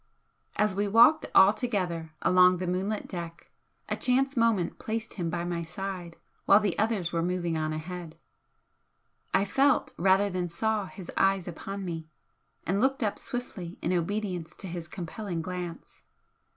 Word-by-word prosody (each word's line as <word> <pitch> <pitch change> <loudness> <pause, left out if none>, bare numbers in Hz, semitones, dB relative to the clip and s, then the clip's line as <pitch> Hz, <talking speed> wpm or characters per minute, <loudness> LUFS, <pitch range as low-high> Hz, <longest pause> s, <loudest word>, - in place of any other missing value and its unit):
As 210 -1 +2
we 205 +1 0
walked 235 +10 +6
all 190 +2 +8
together 180 -10 -2
along 180 0 +6
the 185 - -3
moonlit 190 +4 -2
deck 170 -2 -7 0.4
a - - -1
chance 270 +2 +2
moment 230 -7 +1
placed 225 +1 -3
him 175 -4 -2
by 170 0 -2
my 175 -1 -2
side 180 0 -6 0.3
while 200 - +7
the 205 -4 0
others 210 -5 0
were 165 - +1
moving 175 -1 -1
on 155 -1 -1
ahead. 165 +1 -6 1.1
I 195 +1 +3
felt 270 +7 +2
rather 190 +3 +4
than 180 -1 -2
saw 210 +3 -1
his 185 -2 -9
eyes 195 -2 +2
upon 195 +3 -6
me, 165 -3 -5 0.6
and 195 +4 +1
looked 265 0 +2
up 210 - -1
swiftly 190 -8 -6
in 175 - +1
obedience 180 -1 -2
to 195 - -8
his 170 -1 -6
compelling 175 0 -5
glance. 180 -2 -6
185 Hz, 155 wpm, -28 LUFS, 170-210 Hz, 1.1 s, all